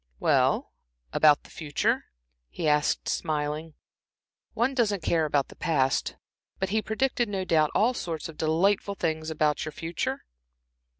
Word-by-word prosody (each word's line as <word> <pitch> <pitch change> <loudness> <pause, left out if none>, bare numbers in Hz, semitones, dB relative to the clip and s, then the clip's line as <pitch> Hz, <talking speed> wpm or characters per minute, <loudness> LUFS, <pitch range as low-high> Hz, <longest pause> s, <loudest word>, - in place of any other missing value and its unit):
"Well, - - +2 0.4
about 150 -2 +5
the - - -17
future?" 150 -2 -1 0.4
he 155 - -3
asked, 150 0 +2
smiling. 150 0 -2 0.8
"One 250 +4 +1
doesn't 210 -8 +1
care 160 -1 +2
about 145 -2 0
the - - -13
past. 140 -6 0 0.4
But 190 - -2
he 215 +2 +1
predicted, 240 +1 0
no 190 -2 -2
doubt, 155 -4 +3
all 235 +5 +3
sorts 165 -9 -4
of 165 - -10
delightful 190 +6 +1
things 160 -3 -2
about 150 -2 +1
the 155 - -3
future?" 165 +2 -4
160 Hz, 140 wpm, -27 LUFS, 150-200 Hz, 0.8 s, about